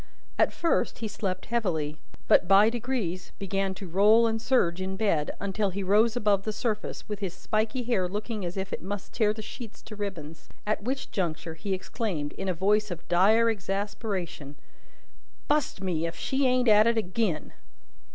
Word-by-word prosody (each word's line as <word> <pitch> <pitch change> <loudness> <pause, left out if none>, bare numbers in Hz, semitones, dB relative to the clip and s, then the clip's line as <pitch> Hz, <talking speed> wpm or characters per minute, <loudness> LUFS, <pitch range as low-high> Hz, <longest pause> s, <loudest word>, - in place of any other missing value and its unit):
At - - +4
first, 335 - 0
he 225 - -3
slept 195 -3 -3
heavily, 165 -10 -1 0.3
but, 180 - +5
by 200 +3 +6
degrees, 220 -7 -3
began 195 0 -1
to 190 - -8
roll 210 +6 +5
and 225 0 0
surge 185 -9 +2
in 190 +1 -3
bed, 180 -8 +1
until 200 +1 -1
he 195 +1 -3
rose 215 +5 +4
above 210 -5 +2
the 215 - -2
surface, 215 0 -3
with 210 -2 -4
his 195 -4 -4
spiky 220 +4 -1
hair 225 -7 +1
looking 210 +2 -4
as 175 +2 -4
if 190 0 -3
it - - -4
must 200 +1 -6
tear 215 -3 +3
the 215 0 -6
sheets 225 0 -9
to 215 - -9
ribbons. 170 -7 -6 0.2
At 215 0 0
which 265 +5 -3
juncture, 170 -3 -2
he 190 +4 -2
exclaimed, 185 -6 -3
in 195 0 -4
a - - +2
voice 210 +4 +2
of 175 -2 -7
dire 210 +6 +5
exasperation: 195 -7 -3 0.9
"Bust 295 -9 +1
me, 170 -3 0
if 165 - -6
she 265 +8 0
ain't 250 -1 +2
at 215 0 +7
it 235 0 +2
agin!" 185 -5 -1
200 Hz, 180 wpm, -28 LUFS, 185-220 Hz, 0.9 s, at